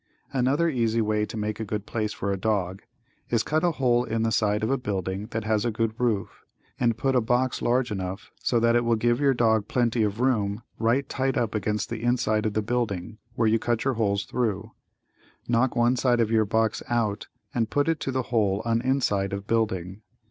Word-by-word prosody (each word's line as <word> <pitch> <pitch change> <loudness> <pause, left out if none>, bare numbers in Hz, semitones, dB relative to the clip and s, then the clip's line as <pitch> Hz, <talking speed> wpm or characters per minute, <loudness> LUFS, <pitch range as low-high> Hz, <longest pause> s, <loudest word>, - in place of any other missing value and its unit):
Another 135 +6 +2
easy 115 -6 +1
way 105 -1 +1
to - - -7
make 105 0 -3
a - - -2
good 105 0 -4
place 110 -2 -2
for 100 -1 -3
a - - 0
dog 95 -2 -1 0.5
is 115 -2 +2
cut 155 +1 0
a 175 -1 +2
hole 125 -4 +2
in 115 -2 -1
the 115 - +1
side 105 -1 +1
of 110 - +1
a 135 - +2
building 100 -3 -3
that 110 -1 -4
has 110 -1 +1
a 120 - +1
good 115 0 -1
roof, 115 -5 -1 0.4
and 115 -2 +2
put 135 +3 0
a 125 - +4
box 125 +2 0
large 120 -1 +1
enough 95 -1 -5
so 120 - +2
that 115 0 +3
it 120 - +3
will 115 0 +2
give 120 +2 +1
your 140 -2 +3
dog 110 -3 +2
plenty 120 -2 +1
of 105 0 0
room 110 -4 +1 0.2
right 120 +5 +1
tight 135 -1 -1
up 115 -3 0
against 105 0 -2
the 115 -1 -4
inside 110 -3 +1
of 105 - -2
the 110 - 0
building 110 -3 -2 0.2
where 115 -3 +2
you 110 +1 +3
cut 120 -1 0
the 135 - +1
holes 100 -3 0
thru. 110 -3 -2 0.8
Knock 120 +2 +2
one 120 +1 +3
side 120 -1 +2
of 115 -1 +1
your 110 -1 +3
box 110 +1 0
out 110 -3 0 0.3
and 115 -2 0
put 145 +1 +1
it 165 -2 +1
to 135 - -2
the 130 0 -1
hole 105 -2 +2
on 115 0 +1
inside 110 -7 0
of 100 0 -4
building. 105 -4 -1
115 Hz, 220 wpm, -26 LUFS, 105-120 Hz, 0.8 s, a